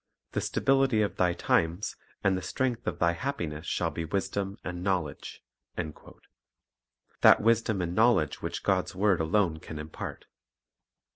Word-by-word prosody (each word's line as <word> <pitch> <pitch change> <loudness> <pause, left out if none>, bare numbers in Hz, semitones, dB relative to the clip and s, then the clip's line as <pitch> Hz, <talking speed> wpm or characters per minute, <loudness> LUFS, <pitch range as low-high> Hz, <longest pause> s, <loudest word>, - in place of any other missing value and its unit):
"The - - -1
stability 135 -5 +2
of 100 - -3
thy 90 -1 +3
times 85 +3 0 0.3
and 100 -1 +3
the 95 - -2
strength 125 +3 -2
of - - -1
thy 85 0 +3
happiness 85 - -4
shall - - 0
be 85 - -4
wisdom 95 +3 -2
and 90 -1 -5
knowledge," 90 -7 -2 0.3
1 80 -3 -3 0.7
— - - -43
that - - +8
wisdom 110 -3 +2
and 85 0 -3
knowledge 110 -7 +3
which - - -4
God's - - 0
word 95 -2 +2
alone 80 -1 +1
can 80 - -8
impart. 75 +1 -7
90 Hz, 150 wpm, -29 LUFS, 80-105 Hz, 0.7 s, that